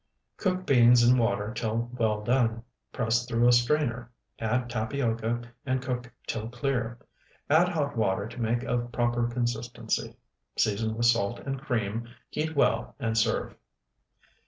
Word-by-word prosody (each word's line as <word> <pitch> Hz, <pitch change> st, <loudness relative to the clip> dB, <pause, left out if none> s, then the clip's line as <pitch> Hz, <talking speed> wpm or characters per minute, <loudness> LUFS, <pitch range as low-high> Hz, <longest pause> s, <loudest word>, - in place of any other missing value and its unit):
Cook 185 Hz, -2 st, -1 dB
beans 120 Hz, -2 st, +6 dB
in 125 Hz, +1 st, +5 dB
water 105 Hz, -1 st, 0 dB
till 115 Hz, 0 st, -2 dB
well 110 Hz, -3 st, 0 dB
done; 115 Hz, -1 st, +1 dB, 0.3 s
press 115 Hz, -1 st, +1 dB
through 120 Hz, 0 st, +3 dB
a -, -, +7 dB
strainer, 120 Hz, -1 st, +2 dB, 0.3 s
add 120 Hz, +2 st, 0 dB
tapioca, 115 Hz, 0 st, -1 dB, 0.2 s
and 130 Hz, -1 st, 0 dB
cook 125 Hz, -1 st, -4 dB
till 110 Hz, 0 st, -3 dB
clear; 120 Hz, -1 st, -2 dB, 0.5 s
add 170 Hz, +4 st, +5 dB
hot 145 Hz, -5 st, -1 dB
water 100 Hz, -2 st, 0 dB
to 120 Hz, +1 st, -8 dB
make 120 Hz, +2 st, 0 dB
of 120 Hz, 0 st, -2 dB
proper 120 Hz, 0 st, +1 dB
consistency; 120 Hz, -1 st, -2 dB, 0.4 s
season 110 Hz, +1 st, +1 dB
with 120 Hz, -, +1 dB
salt 115 Hz, -2 st, +3 dB
and 135 Hz, -1 st, -4 dB
cream; 115 Hz, -5 st, -2 dB, 0.2 s
heat 160 Hz, +1 st, -2 dB
well, 140 Hz, -, +1 dB
and 115 Hz, -4 st, -1 dB
serve. 110 Hz, -, +1 dB
120 Hz, 140 wpm, -28 LUFS, 115-125 Hz, 0.5 s, a